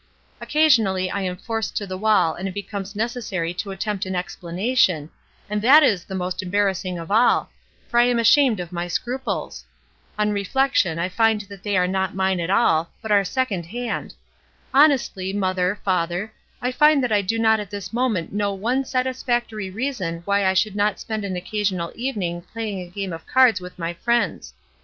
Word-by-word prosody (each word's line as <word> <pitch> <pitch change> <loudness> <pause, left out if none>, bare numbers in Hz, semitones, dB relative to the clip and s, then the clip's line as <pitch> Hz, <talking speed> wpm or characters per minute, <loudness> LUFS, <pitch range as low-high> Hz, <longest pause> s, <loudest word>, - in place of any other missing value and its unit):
Occasionally 220 -12 +3
I 200 - -2
am 180 -1 -3
forced 225 +2 -3
to 205 - -2
the 185 -1 -5
wall 210 -4 +3
and 190 +3 -5
it 185 - -6
becomes 200 0 -6
necessary 210 -7 -2
to 180 +3 -5
attempt 195 +1 -3
an 190 - -3
explana 180 +6 -3
tion, 160 - +3 0.4
and 210 0 -2
that 285 +7 +7
is 200 -10 +2
the 190 - -6
most 180 0 -2
embarrassing 185 -1 -1
of 165 +3 -7
all, 230 +4 +3 0.4
for 240 - +2
I 240 - +6
am 245 -1 +2
ashamed 230 -1 +4
of 175 -1 -6
my 175 0 -3
scruples. 250 +9 -3 0.5
On 210 0 +1
reflection 205 -3 +1
I 170 +1 0
find 220 +2 +2
that 200 -2 -12
they 205 -2 0
are 180 - +3
not 190 0 -1
mine 190 -1 +1
at 170 +1 -2
all, 170 -6 +3
but 220 - -5
are 200 -1 +5
second 195 -6 -2
hand. 240 +4 -4 0.6
Honestly, 265 -10 +3
mother, 185 0 0
father, 180 +3 -1 0.3
I 250 - +1
find 300 +1 +4
that 245 - -1
I 205 -1 +3
do 200 +4 -1
not 220 -1 +3
at 205 -2 -6
this 200 -1 -7
moment 230 -10 -1
know 205 -1 -1
one 245 +7 0
satis 255 0 -2
factory 230 -5 -1
reason 190 -7 -3
why 200 0 +2
I 190 - +2
should 205 +1 +1
not 205 -1 +1
spend 215 -2 -4
an 190 -2 -3
occa 195 +4 -4
sional 185 -4 -1
evening 200 -9 -3
playing 210 +1 -5
a 175 - -9
game 190 0 -4
of 165 - -9
cards 250 -7 +4
with 180 0 -10
my 170 -1 -3
friends. 185 - -1
200 Hz, 195 wpm, -22 LUFS, 185-230 Hz, 0.6 s, that